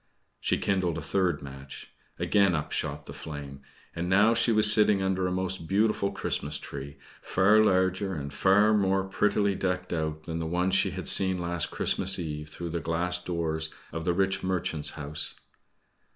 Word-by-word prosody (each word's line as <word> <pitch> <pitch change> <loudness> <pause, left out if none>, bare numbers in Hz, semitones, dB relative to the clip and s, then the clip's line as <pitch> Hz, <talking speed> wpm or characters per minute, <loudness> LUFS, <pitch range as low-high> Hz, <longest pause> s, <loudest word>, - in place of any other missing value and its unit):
She - - 0
kindled 95 -4 -1
a - - -4
third 85 -3 -1
match. 70 0 -10 0.3
Again 100 -4 +2
up 75 - -4
shot - - -3
the - - -9
flame. 70 -3 -8 0.3
And 85 +1 -3
now 105 +4 +4
she 115 0 +2
was 105 -1 +7
sitting 105 -2 +3
under 95 -1 -1
a - - -2
most 95 -2 -3
beautiful 100 +1 +1
Christmas 75 +1 -2
tree, 70 0 -8 0.2
far 105 +4 +3
larger, 95 -1 +1
and 70 -2 -6
far 105 +5 +3
more 95 -2 +1
prettily 100 +1 0
decked 90 -1 -3
out, 80 -1 -3
than 80 0 -5
the 80 - -3
one 90 +3 0
she 95 +1 +3
had 95 +1 -4
seen 95 -1 +5
last 85 -2 -1
Christmas 95 0 +2
Eve 75 -3 -5
through 85 +2 -6
the 85 +1 -3
glass 85 +3 -1
doors 80 -3 -1 0.2
of 80 - -5
the 90 - +1
rich 95 0 0
merchant's 90 -5 -1
house. 75 0 -4
90 Hz, 175 wpm, -27 LUFS, 80-95 Hz, 0.3 s, was